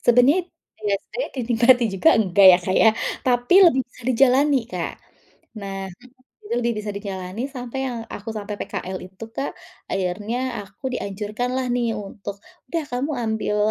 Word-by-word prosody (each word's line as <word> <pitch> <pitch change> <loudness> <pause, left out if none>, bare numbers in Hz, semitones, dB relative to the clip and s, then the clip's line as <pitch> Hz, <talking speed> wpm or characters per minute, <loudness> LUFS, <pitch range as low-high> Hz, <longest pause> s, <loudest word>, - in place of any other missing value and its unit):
Sebenarnya 275 +10 +4 0.3
iya, 205 -1 +1 0.2
saya - - -2
dinikmati 240 0 +4
juga 255 - +4
enggak 200 -2 +5
ya, 175 - +5
Kak, 185 - 0
ya. 220 - +7 0.4
Tapi 245 +5 +3
lebih 265 -5 +1
bisa 245 - -19
dijalani, 270 +3 +4
Kak. - - -4 0.7
Nah 195 -1 -5 0.4
mhm, 415 +10 -13
lebih 235 0 +1
bisa 210 0 -4
dijalani 200 +4 -5
sampai 250 -1 -6
yang 240 -2 -4
aku 210 +3 -8
sampai 210 0 -4
PKL 185 0 -4
itu, 190 +4 -10
Kak, 275 - -3 0.4
akhirnya 210 +7 -2
aku 210 +7 -7
dianjurkanlah 220 +6 -3
nih 240 -2 0
untuk, 200 0 -7 0.3
"Udah 330 0 -1
kamu 255 +5 -2
ambil 220 -3 -1
235 Hz, 150 wpm, -23 LUFS, 200-255 Hz, 0.7 s, ya